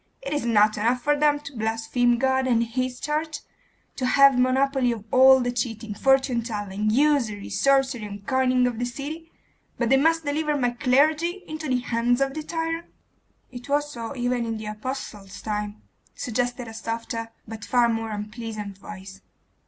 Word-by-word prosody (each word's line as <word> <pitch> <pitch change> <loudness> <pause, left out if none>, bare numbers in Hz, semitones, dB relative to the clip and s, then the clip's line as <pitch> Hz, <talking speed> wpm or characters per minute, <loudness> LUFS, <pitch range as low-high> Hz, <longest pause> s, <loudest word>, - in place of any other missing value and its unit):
It 275 - -3
is 290 - -1
not 215 -2 +4
enough 240 +3 +1
for 295 0 +3
them 290 0 +3
to 280 -2 -10
blaspheme 225 +2 +1
God 265 +1 +1
and 235 -2 +3
His 250 +2 -3
church, 305 0 -2 0.6
to 255 - 0
have 275 +1 +6
the 250 - +3
monopoly 265 0 +2
of 220 -3 -5
all 265 +1 +7
the 245 0 0
cheating, 225 -3 -3
fortune 265 +1 +2
telling, 210 -2 -3
usury, 240 -5 +1
sorcery, 265 +1 +2
and 200 -1 -9
coining 255 0 +2
of 240 -2 -2
the 245 - 0
city, 300 +7 -6 0.5
but 235 -2 0
they 270 - +5
must 325 +3 +2
deliver 300 +1 0
my 245 -3 +1
clergy 305 +9 +2
into 310 0 -5
the 250 -1 +1
hands 245 0 +1
of 270 0 0
the 310 - -4
tyrant?' 330 +1 -3 0.6
'It 245 +1 -10
was 295 +1 +1
so 235 0 -6
even 245 -1 0
in 225 -1 -3
the 215 - -7
apostles' 210 -3 -6
time,' 210 0 -4 0.3
suggested 245 0 -2
a 225 - -8
softer 230 +1 -4 0.2
but 220 0 -8
far 245 -1 +3
more 225 -1 -2
unpleasant 210 -1 -6
voice. 195 -1 -10
245 Hz, 175 wpm, -25 LUFS, 225-275 Hz, 0.6 s, all